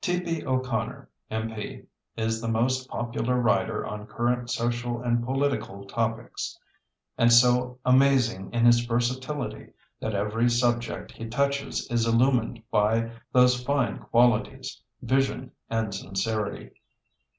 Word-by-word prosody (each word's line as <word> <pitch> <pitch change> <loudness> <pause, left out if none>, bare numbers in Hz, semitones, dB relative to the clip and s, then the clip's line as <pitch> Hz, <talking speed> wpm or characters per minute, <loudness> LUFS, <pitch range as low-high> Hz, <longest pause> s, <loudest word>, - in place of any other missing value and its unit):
T.P. 180 -4 -1
O'Connor, 130 -3 -2 0.2
M.P., 110 -1 -5 0.3
is 110 0 -1
the 115 - -3
most 130 +3 0
popular 120 +1 -1
writer 120 -3 +1
on 105 0 -6
current 120 +1 -1
social 120 0 -1
and 120 -1 0
political 130 -7 -2
topics, 115 +2 -3 0.6
and 115 0 +5
so 125 +1 +5
amazing 125 -6 +3
is 120 - 0
his 120 0 +7
versatility 125 +4 -2 0.3
that 110 -1 -3
every 105 +4 +1
subject 120 0 0
he 115 - -8
touches 140 +4 -1
is 115 -1 +1
illumined 115 -1 +2
by 115 +2 +2 0.2
those 125 0 +4
fine 140 -2 0
qualities, 125 +3 +1 0.2
vision 130 0 0 0.2
and 110 -2 -1
sincerity. 100 +3 -3
120 Hz, 115 wpm, -26 LUFS, 115-130 Hz, 0.6 s, his